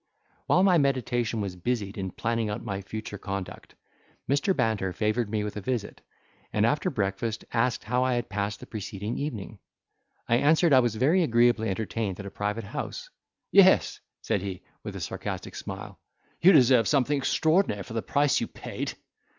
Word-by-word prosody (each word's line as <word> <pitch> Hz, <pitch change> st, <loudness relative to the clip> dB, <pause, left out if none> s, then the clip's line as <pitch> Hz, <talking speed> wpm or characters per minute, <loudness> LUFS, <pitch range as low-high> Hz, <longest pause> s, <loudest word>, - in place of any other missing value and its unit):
While 180 Hz, -, +4 dB
my 185 Hz, -3 st, +5 dB
meditation 120 Hz, -5 st, 0 dB
was 95 Hz, -3 st, -4 dB
busied 100 Hz, +1 st, -2 dB
in 95 Hz, -3 st, -3 dB
planning 115 Hz, +3 st, -1 dB
out 105 Hz, +2 st, -4 dB
my 100 Hz, 0 st, -4 dB
future 105 Hz, 0 st, -7 dB
conduct, 95 Hz, -1 st, -6 dB, 0.5 s
Mr. 145 Hz, +8 st, +2 dB
Banter 100 Hz, -5 st, 0 dB
favoured 110 Hz, +2 st, 0 dB
me 105 Hz, -1 st, -1 dB
with 105 Hz, 0 st, -5 dB
a -, -, -4 dB
visit, 115 Hz, -1 st, -3 dB, 0.5 s
and -, -, +2 dB
after -, -, +1 dB
breakfast 100 Hz, +3 st, -2 dB
asked 120 Hz, +1 st, +1 dB
how 125 Hz, +4 st, +1 dB
I 130 Hz, -1 st, +1 dB
had 120 Hz, -, -2 dB
passed 100 Hz, +1 st, -3 dB
the -, -, -8 dB
preceding 105 Hz, +1 st, -5 dB
evening. 110 Hz, -7 st, -5 dB, 0.7 s
I 120 Hz, -, +4 dB
answered 155 Hz, +4 st, +4 dB
I 130 Hz, -, +8 dB
was 120 Hz, -3 st, +1 dB
very 150 Hz, +11 st, +3 dB
agreeably 120 Hz, -5 st, +3 dB
entertained 105 Hz, -1 st, -3 dB
at 100 Hz, -, -6 dB
a 100 Hz, -, -7 dB
private 105 Hz, +3 st, -2 dB
house. 100 Hz, -, -6 dB, 0.4 s
"Yes," -, -, +5 dB, 0.2 s
said 100 Hz, -, 0 dB
he, 95 Hz, -2 st, -6 dB, 0.2 s
with -, -, -7 dB
a -, -, -5 dB
sarcastic -, -, -5 dB
smile, -, -, -7 dB, 0.4 s
"you 185 Hz, -, +8 dB
deserve 130 Hz, -7 st, +5 dB
something 140 Hz, 0 st, +2 dB
extraordinary 155 Hz, -, +2 dB
for 110 Hz, -, -10 dB
the 115 Hz, -, -1 dB
price 145 Hz, +3 st, +2 dB
you -, -, -1 dB
paid." -, -, -6 dB
115 Hz, 175 wpm, -27 LUFS, 100-130 Hz, 0.7 s, I